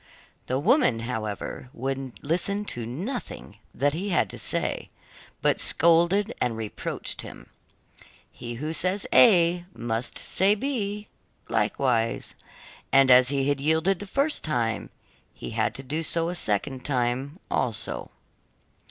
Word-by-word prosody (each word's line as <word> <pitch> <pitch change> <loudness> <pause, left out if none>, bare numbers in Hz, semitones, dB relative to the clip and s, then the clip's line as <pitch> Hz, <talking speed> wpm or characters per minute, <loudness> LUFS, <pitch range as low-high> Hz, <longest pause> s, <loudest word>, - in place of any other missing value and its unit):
The 130 - 0
woman, 140 - +3
however, 110 0 -4
would 135 0 -4
listen 200 +7 0
to 120 -2 -5
nothing 165 - -6
that 145 +3 +1
he 190 +6 -3
had 175 - +1
to - - -9
say, - - -2 0.5
but - - +2
scolded 175 +6 +3
and 120 -3 0
reproached 110 -2 -4
him. - - -11 0.8
He 120 -1 -7
who 150 +6 -4
says 185 +6 0
A 175 -6 +6
must 115 +1 -3
say 195 +3 +3
B, 210 -4 -3 0.4
likewise, 115 -4 0 0.6
and 135 -1 +6
as 125 0 +7
he 140 -1 0
had 145 -1 0
yielded 160 +5 +2
the 205 - -7
first 280 +8 0
time, 120 -8 -1 0.5
he - - -7
had 110 0 0
to 135 - -5
do 150 +5 -2
so 165 +1 0
a - - -2
second 130 - -1
time 130 +3 -1
also. - - -2
145 Hz, 135 wpm, -26 LUFS, 125-185 Hz, 0.8 s, as